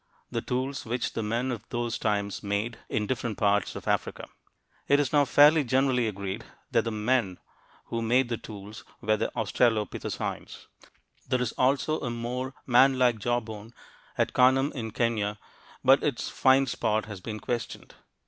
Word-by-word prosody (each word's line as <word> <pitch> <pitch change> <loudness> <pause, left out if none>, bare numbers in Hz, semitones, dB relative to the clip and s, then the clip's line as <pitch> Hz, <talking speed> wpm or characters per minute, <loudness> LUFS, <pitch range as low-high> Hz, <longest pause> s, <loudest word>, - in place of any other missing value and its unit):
The - - -1
tools 130 +2 -2
which 120 +2 -2
the - - -2
men 115 +4 -1
of 120 - -5
those 120 -1 -2
times 100 -2 -1
made, 105 +3 -2
in 105 - 0
different 115 -3 -3
parts 100 -2 +1
of - - -8
Africa. - - -1 0.6
It 145 - +4
is 145 -1 0
now 145 -1 +5
fairly 150 +3 +6
generally 130 -1 +2
agreed 100 +1 -4 0.3
that 115 - +2
the 115 - -1
"men" 110 -3 0 0.5
who 115 - -3
made 120 +3 +2
the 120 -1 -2
tools 105 0 -10 0.2
were 110 +1 +1
the 110 - -2
australopithecines. 110 0 -1 0.6
There 130 -1 +2
is 125 -2 -1
also 140 +4 +1
a 120 - -3
more 125 +3 -4
"man 130 +2 +5
like" 120 -3 +3
jawbone 115 -1 -3 0.4
at - - +1
Kanam 130 +2 +4
in 115 -5 -5
Kenya, 105 -2 -1 0.5
but - - +6
its - - -1
find 135 +1 +4
spot 110 -2 0
has 105 -4 -8
been 110 +1 -5
questioned. 120 +1 -5
120 Hz, 160 wpm, -27 LUFS, 110-130 Hz, 0.6 s, fairly